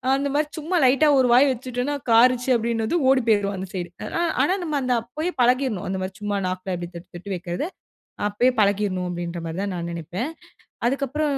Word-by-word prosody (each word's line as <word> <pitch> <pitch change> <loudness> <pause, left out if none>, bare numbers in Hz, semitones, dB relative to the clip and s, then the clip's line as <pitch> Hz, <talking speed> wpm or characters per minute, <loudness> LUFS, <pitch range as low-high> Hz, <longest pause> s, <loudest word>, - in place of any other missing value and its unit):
அந்த 280 +1 -1
மாரி 300 0 +2
சும்மா 335 +5 -2
லைட்டா 275 +4 +5
ஒரு 255 - +4
வாய் 270 +3 +6
வச்சுட்டோன்னா, 255 +3 -3 0.2
காரிச்சு 245 +2 +5
அப்டின்னதும் 230 +6 0
ஓடி 260 -3 +3
போயிரும் 200 -2 +2
அந்த 190 +1 -5
சைடு. 175 -2 -4 0.2
அத - - -7 0.3
ஆனா 360 - +2
நம்ம 305 -3 -1
அந்த 250 -1 +1
அப்பயே 305 +10 -4
பழகிர்ணும். 250 -4 +2
அந்த 190 0 -2
மாரி 190 0 -4
சும்மா 205 -1 -1
நாக்ல 185 0 -3
அப்டி 175 0 -6
தொட்டு 175 +2 -10
தொட்டு 195 +3 -7
வைக்கிறது. 175 - -3 0.6
அப்பயே 245 +5 +2
பழக்கிறணும் 200 -3 +1
அப்டின்ற 175 0 -4
மாரி 165 +2 -5
தான் 200 -2 -2
நான் 170 0 -4
நினைப்பேன். 175 - -4 0.6
அதுக்கப்புறம் 280 +2 0
230 Hz, 185 wpm, -23 LUFS, 185-270 Hz, 0.6 s, வாய்